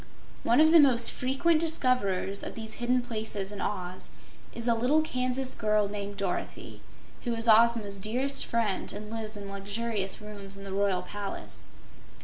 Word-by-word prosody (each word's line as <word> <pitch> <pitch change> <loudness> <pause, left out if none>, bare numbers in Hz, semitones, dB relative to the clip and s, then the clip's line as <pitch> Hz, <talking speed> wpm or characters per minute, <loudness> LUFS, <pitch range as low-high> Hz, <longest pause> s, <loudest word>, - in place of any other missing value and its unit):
One 235 +4 +3
of 315 +1 +6
the 335 - +8
most 250 -5 +4
frequent 275 +6 +1
discoverers 250 - 0
of - - -6
these 220 -1 -4
hidden 250 +1 +1
places 215 -4 -3
in 205 - -6
Oz 185 -2 -4 0.4
is 235 0 -5
a 235 - +4
little 255 +7 +2
Kansas 255 -2 +1
girl 210 -1 +1
named 200 0 -5
Dorothy, 195 -3 -4 0.4
who 240 -2 -1
is 230 +1 0
Ozma's 220 -3 +5
dearest 255 +7 +1
friend 230 -5 -1
and 210 +1 -8
lives 220 -1 -3
in 200 -1 -7
luxurious 200 +1 -3
rooms 200 -2 -9
in 195 - -10
the 195 -1 -6
Royal 195 -2 +1
Palace. 200 +2 -7
220 Hz, 160 wpm, -28 LUFS, 200-245 Hz, 0.4 s, the